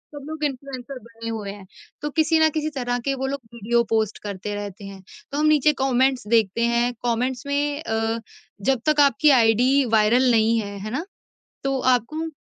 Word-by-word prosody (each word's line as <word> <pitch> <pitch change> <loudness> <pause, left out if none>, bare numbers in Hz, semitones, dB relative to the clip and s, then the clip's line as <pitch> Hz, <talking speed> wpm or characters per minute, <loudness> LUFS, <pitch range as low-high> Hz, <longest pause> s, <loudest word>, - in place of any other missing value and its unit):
सब 285 - -8
लोग 315 -1 -6
इन्फ्लुएंसर 275 -1 -4
बने 230 0 -9
हुए 210 -3 -4
हैं। 200 -1 -11 0.4
तो 295 - -2
किसी 320 +2 +2
ना 315 - +6
किसी 310 0 -1
तरह 245 -1 -1
के 275 - +1
वो 265 0 -3
लोग 280 +1 -3
वीडियो 235 +1 +1
पोस्ट 220 -2 0
करते 205 0 -5
रहते 205 0 -7
हैं। 195 -1 -10 0.3
तो 285 - -3
हम 305 - +2
नीचे 300 0 +4
कमेंट्स 260 -2 +1
देखते 225 -1 +2
हैं, 240 +1 +1
कमेंट्स 245 +2 -1
में 290 +1 -1
अ, 225 -2 -1 0.4
जब 255 +3 +1
तक 305 -1 +2
आपकी 280 +2 +4
आईडी 250 +5 +3
वायरल 240 +4 +4
नहीं 225 0 +3
है, 200 -1 -5
है 215 +2 -6
ना? 290 +8 -3 0.6
तो 270 -1 0
आपको 255 +6 +1
245 Hz, 190 wpm, -23 LUFS, 225-280 Hz, 0.6 s, ना